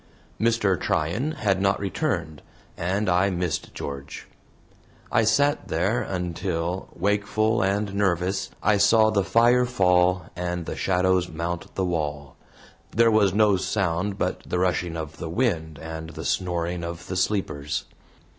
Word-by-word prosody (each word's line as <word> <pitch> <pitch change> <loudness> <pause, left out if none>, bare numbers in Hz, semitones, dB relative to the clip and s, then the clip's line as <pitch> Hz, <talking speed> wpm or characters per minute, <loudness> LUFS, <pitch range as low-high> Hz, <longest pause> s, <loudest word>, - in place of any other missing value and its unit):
Mr. 110 -4 +2
Tryan 90 - 0
had 100 - 0
not 100 0 +2
returned, 95 - -2 0.3
and 95 +5 -1
I 90 +2 +3
missed 90 -3 -2
George. 70 0 -6 0.9
I 115 - +3
sat 140 +7 +2
there 100 +9 0
until, 90 0 -3
wakeful 110 +3 +1
and 100 +1 0
nervous, 95 -1 0
I 105 0 +4
saw 110 +2 +5
the 100 -2 +2
fire 120 +4 +4
fall 90 -5 +3
and 90 -1 -3
shadows 90 -1 +1
mount 85 +2 -5
the 95 - 0
wall. 75 -5 -3 0.5
There 115 +1 +4
was 100 -3 +3
no 105 -2 +4
sound 95 0 -1
but - - -1
the 90 - -3
rushing 90 -2 0
of 80 -1 -6
the 80 - -5
wind 80 - -1
and 80 +1 -7
the - - -8
snoring 90 -1 -1
of 85 0 -6
the 95 - -5
sleepers. 80 -7 -1
95 Hz, 135 wpm, -25 LUFS, 85-105 Hz, 0.9 s, saw